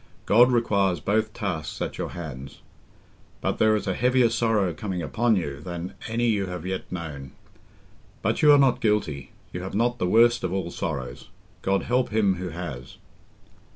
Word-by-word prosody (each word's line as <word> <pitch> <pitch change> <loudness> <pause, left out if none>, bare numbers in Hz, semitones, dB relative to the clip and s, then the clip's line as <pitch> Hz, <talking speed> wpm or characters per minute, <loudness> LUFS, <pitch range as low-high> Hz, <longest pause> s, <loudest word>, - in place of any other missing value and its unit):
God 120 +4 +6
requires 100 -7 +2
both 110 +2 0
tasks 85 -9 -4
at - - -4
our - - -2
hands. 70 -6 -8 0.8
And - - 0
there 110 0 +4
is 105 - -2
a 95 - 0
heavier 125 +1 +3
sorrow 110 -6 +1
coming 90 0 -4
upon 110 - +1
you 70 -7 -3
than 85 +2 -6
any 115 +1 0
you 105 -4 +1
have 90 -1 -6
yet 95 0 -4
known. 75 -6 -6 0.9
But - - 0
you 150 - +7
are 145 - +8
not 135 -3 +3
guilty—you 90 - -2
have 95 +1 -6
not 120 +3 +1
the 90 - 0
worst 120 +3 +4
of 90 - -1
all 95 -2 -2
sorrows. 65 -8 -5 0.3
God 95 0 +1
help 125 +1 +1
him 105 -4 +2
who 90 0 -4
has!" 80 -7 -7
95 Hz, 170 wpm, -25 LUFS, 85-115 Hz, 0.9 s, are